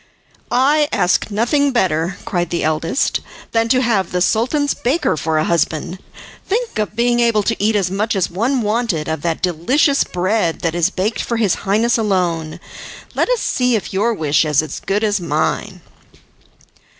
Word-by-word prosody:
"I 290 +4 +3
ask 180 +1 +1
nothing 245 +7 +1
better," 180 -6 0
cried 175 -2 -1
the 170 - -2
eldest, 155 - 0 0.3
"than 230 0 +1
to 255 +2 +3
have 205 -7 0
the 180 - 0
Sultan's 255 - +1
baker 265 - 0
for 155 +1 -1
a 155 - +2
husband. 170 +2 -1 0.4
Think 445 - -2
of 210 0 -2
being 240 +1 +2
able 230 -3 +2
to 225 -1 -1
eat 215 +1 +2
as 190 -3 0
much 210 +3 -1
as 190 -3 +1
one 240 +8 -1
wanted, 210 -7 -1
of 160 -2 -3
that 165 0 -2
delicious 250 - +2
bread 180 -1 -1
that 165 -2 -1
is 175 +1 +2
baked 200 +3 -2
for 235 - -2
his 210 -5 +2 0.2
Highness 230 +4 +2
alone! 175 -7 -1 0.5
Let - - 0
us - - +1
see 250 -1 +1
if 210 - -4
your 210 +5 +1
wish 150 -4 +2
is 150 -1 +2
as 155 - -6
good 200 +3 -1
as 205 -2 +1
mine." 170 +4 -2
205 Hz, 175 wpm, -18 LUFS, 170-235 Hz, 0.5 s, I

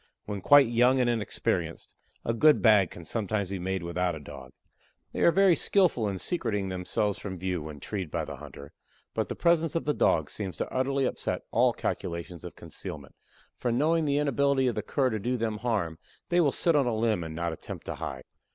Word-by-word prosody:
When 100 -2 -4
quite 145 +6 +7
young 125 +3 +3
and 125 - +3
inexperienced, 115 -4 -2 0.3
a 115 - +1
good 150 +6 +5
bag 105 -6 +5
can 85 - -11
sometimes 105 -2 -2
be 95 -1 -4
made 95 0 -2
without 85 0 -1
a - - -7
Dog. 70 -3 -11 0.6
They - - -4
are 170 - +5
very 195 -1 +5
skillful 165 - +2
in 95 - -3
secreting 105 - -2
themselves 95 +2 -1
from 95 -2 -6
view, 90 -1 -2
when 75 -1 -8
treed 95 +1 -4
by - - -2
the - - -7
hunter, 70 0 -11 0.4
but - - -2
the - - -3
presence 165 -2 +2
of 165 - -1
the 150 - +1
Dog - - +2
seems 95 -6 -4
to - - -4
utterly 135 +1 +1
upset - - -2
all - - +4
calculations 85 0 -4
of - - -8
concealment, 70 -2 -9 0.4
for 120 - -2
knowing 155 +6 +2
the 140 -1 +1
inability 140 -1 +2
of 120 - +1
the 105 - -2
Cur 130 +4 0
to 110 - -2
do 125 +5 -1
them 110 -2 -2
harm 105 -9 -1 0.3
they 175 0 +4
will 145 -4 +3
sit 170 +3 +2
on 140 -4 +3
a 120 - 0
limb 110 -5 +1
and 80 -1 -6
not 85 0 -2
attempt - - -8
to - - -3
hide. 65 -1 -6
110 Hz, 210 wpm, -28 LUFS, 90-135 Hz, 0.6 s, quite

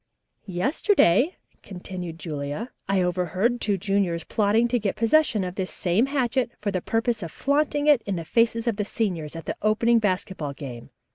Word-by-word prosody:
"Yesterday," 255 - +2 0.2
continued 180 -3 -7
Julia, 150 - -5 0.2
"I 195 -2 +2
overheard 185 +7 0
two 205 -2 +1
juniors 190 -3 0
plotting 220 +5 +2
to 245 0 +1
get 205 -3 -1
possession 230 -2 +3
of 180 -1 -4
this 185 -1 -3
same 195 +8 +1
hatchet 260 -3 0
for 205 -1 -2
the 185 -2 -2
purpose 225 +2 0
of 165 -3 -5
flaunting 290 - 0
it 295 -5 +5
in 200 - -1
the 165 -2 -5
faces 230 +5 +2
of 230 -4 0
the 210 - 0
seniors 175 -9 -2
at 165 - -7
the - - -3
opening 230 +2 +3
basketball 185 -7 -2
game. 130 -5 -8
200 Hz, 170 wpm, -25 LUFS, 180-235 Hz, 0.2 s, it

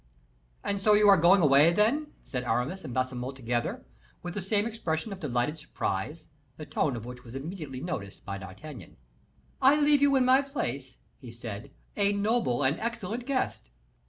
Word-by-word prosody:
"And 200 -1 -2
so 210 +1 +5
you 210 0 +5
are 200 - +9
going 180 +2 +5
away, 145 +3 +6
then?" 225 - +2 0.2
said 125 -2 -4
Aramis 125 +10 -1
and 135 - -6
Baisemeaux 130 +1 -2
together, 120 -2 -3 0.4
with 175 0 -5
the 205 - -3
same 205 +3 +1
expression 215 -4 -3
of 190 - -9
delighted 145 0 -1
surprise, 150 +13 -4 0.3
the 155 - -7
tone 145 -2 0
of 115 -1 -6
which 125 0 -9
was 120 0 -11
immediately 145 -3 -6
noticed 100 - -5
by 100 -1 -4
D'Artagnan. 100 - -10 0.6
"I 275 +3 +6
leave 290 -1 +4
you 285 -1 +5
in 260 -1 +4
my 260 +2 +6
place," 140 - -4 0.2
he 125 -3 -10
said, 115 +1 -7 0.3
"a 200 0 +3
noble 205 - +1
and 135 +4 +1
excellent 235 +1 -3
guest." 255 - -2
155 Hz, 175 wpm, -28 LUFS, 125-210 Hz, 0.6 s, are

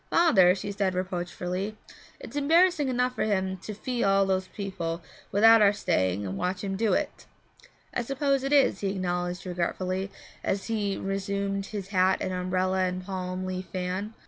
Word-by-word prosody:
'Father,' 190 - +5
said 200 0 -5
she 190 -2 +1
reproachfully, 185 +2 -3 0.4
'it's - - -10
embarrassing 320 +1 +4
enough 250 0 +1
for - - -1
him 190 -3 0
to 210 +3 -7
fee 245 +3 -2
all 195 0 +4
those 190 -1 0
people 170 -5 -4 0.3
without 225 +2 +7
our 200 -1 +7
staying 95 - 0
and 95 +1 -4
watching 185 +2 -2
him - - -2
do 220 0 +2
it.' - - -2 0.7
'I - - 0
suppose 275 +2 0
it 275 - -2
is,' 275 -9 +4
he 200 - -1
acknowledged 180 -1 -2
regretfully, 185 +2 -2 0.3
as 195 0 -1
he 210 -3 -1
resumed 195 0 -2
his 200 -2 -6
hat 190 -1 +3
and 185 - -2
umbrella 185 +1 0
and 185 0 -1
palm 185 -1 -4
leaf 185 0 -4
fan. 185 +4 -3
195 Hz, 170 wpm, -27 LUFS, 185-215 Hz, 0.7 s, without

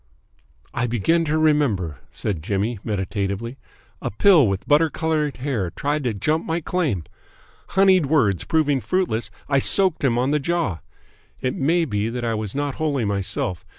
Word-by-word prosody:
"I 120 +1 -1
begin 145 - +1
to 155 0 0
remember," 130 - +1
said 95 -7 -3
Jimmy 100 +6 -2
meditatively. 100 +3 -3 0.4
"A - - -2
pill 155 - +5
with 95 -1 -3
butter 155 +2 +4
coloured 155 -2 -1
hair 125 -9 -2
tried 145 - -2
to 120 - 0
jump 155 - 0
my 165 +1 -1
claim. 155 - -1 0.7
Honeyed 190 -5 +5
words 115 - +2
proving 150 -4 +1
fruitless, 175 -12 -1 0.2
I 140 -1 +3
soaked 185 +3 +3
him 120 -4 +2
on 130 +3 +1
the 150 - +2
jaw. 155 - -1 0.6
It 130 - -1
may 165 +5 +1
be 105 -4 -1
that 120 0 -4
I 115 - 0
was 110 -1 -4
not 145 -1 -1
wholly 140 -7 0
myself. 100 -3 -2
135 Hz, 160 wpm, -22 LUFS, 105-155 Hz, 0.7 s, pill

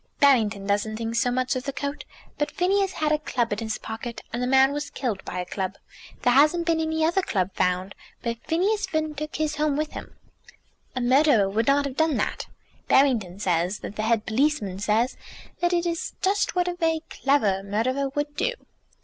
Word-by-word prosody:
"Barrington 220 -8 +3
doesn't 205 +2 0
think 230 0 -3
so 235 +1 +2
much 255 +2 0
of 255 +1 -3
the 275 - -1
coat. 280 +1 -4 0.3
But 295 - +1
Phineas 390 +1 +1
had 305 -1 0
a 305 - +2
club 240 -7 -1
in 205 - -3
his 220 -1 -3
pocket, 225 +1 -7
and 240 - -2
the 250 - 0
man 265 +1 +5
was 290 0 -3
killed 235 -10 -3
by 180 - -6
a 180 - -3
club. 190 +1 -3 0.5
There 245 - +4
hasn't 305 +6 +4
been 330 -1 +2
any 320 0 +1
other 345 +4 +2
club 190 - -1
found, 180 +2 0 0.3
but 235 -1 -3
Phineas 400 +6 +1
Finn 310 -1 -1
took 305 +1 -5
his 310 -1 -1
home 300 -1 +1
with 305 0 -2
him." - - -9 0.8
"A 255 - -1
murderer 255 -4 +4
would 215 +5 0
not 285 +1 +4
have 275 -2 -5
done 315 -4 +2
that." - - -2 0.4
"Barrington 235 -10 +3
says 180 0 0
that 205 - -7
the 215 - -2
head 220 0 +1
policeman 220 -6 0
says 220 +4 +1 0.4
that 350 0 +2
it 350 -1 +1
is 335 -1 -3
just 395 +1 +1
what 360 0 +2
a 355 - 0
very 325 -2 0
clever 220 -9 +2
murderer 245 +8 -1
would 290 +1 -3
do." - - 0
265 Hz, 200 wpm, -25 LUFS, 220-310 Hz, 0.8 s, man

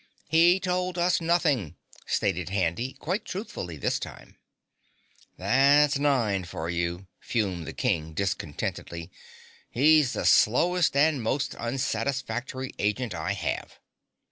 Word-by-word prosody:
"He 170 +4 +5
told 180 -1 -1
us 175 0 +2
nothing," 160 - +1 0.3
stated 90 -3 0
Handy 100 +6 -1
quite 190 +7 -3
truthfully, 90 - -6
this - - -1
time. - - -10 1.0
"That's 140 +8 +4
Nine 120 -10 +1
for 85 -1 -5
you," 85 +2 -2
fumed 95 -8 -2
the - - -6
King 80 -1 -1
discontentedly. 85 -1 -3 0.6
"He's 150 +1 +4
the - - -3
slowest 170 +8 +4
and 145 -2 +3
most 130 +5 -1
unsatisfactory 130 +1 -3
agent 105 +3 -1
I - - -2
have. - - -4
125 Hz, 115 wpm, -27 LUFS, 95-150 Hz, 1.0 s, He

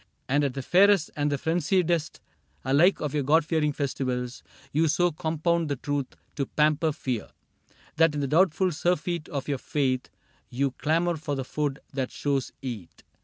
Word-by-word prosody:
And 145 +2 +2
at 140 -2 -1
the 135 - -4
fairest 195 +1 +4
and 145 0 0
the 145 - +1
frenziedest 165 +1 0 0.4
Alike 150 +9 +4
of 150 -3 -2
your 150 - +1
God 150 +3 +3
fearing 155 -2 +1
festivals. 130 -3 -3 0.3
You 160 +3 +2
so 175 +3 +2
compound 160 +1 0
the 140 - 0
truth 140 0 -3 0.2
to 140 -2 -1
pamper 155 +1 +2
fear 130 -7 -3 0.7
That 165 -1 +4
in 145 - -1
the 140 - 0
doubtful 180 +4 +3
surfeit 175 0 -1
of 140 -2 -4
your 140 -3 -1
faith 130 -3 -1 0.4
You 135 +2 0
clamor 165 +5 0
for 150 -1 -3
the 135 -1 -3
food 145 0 -2 0.2
that 130 -2 -2
shadows 140 -3 -1
eat. 105 -11 -7
150 Hz, 170 wpm, -26 LUFS, 135-165 Hz, 0.7 s, fairest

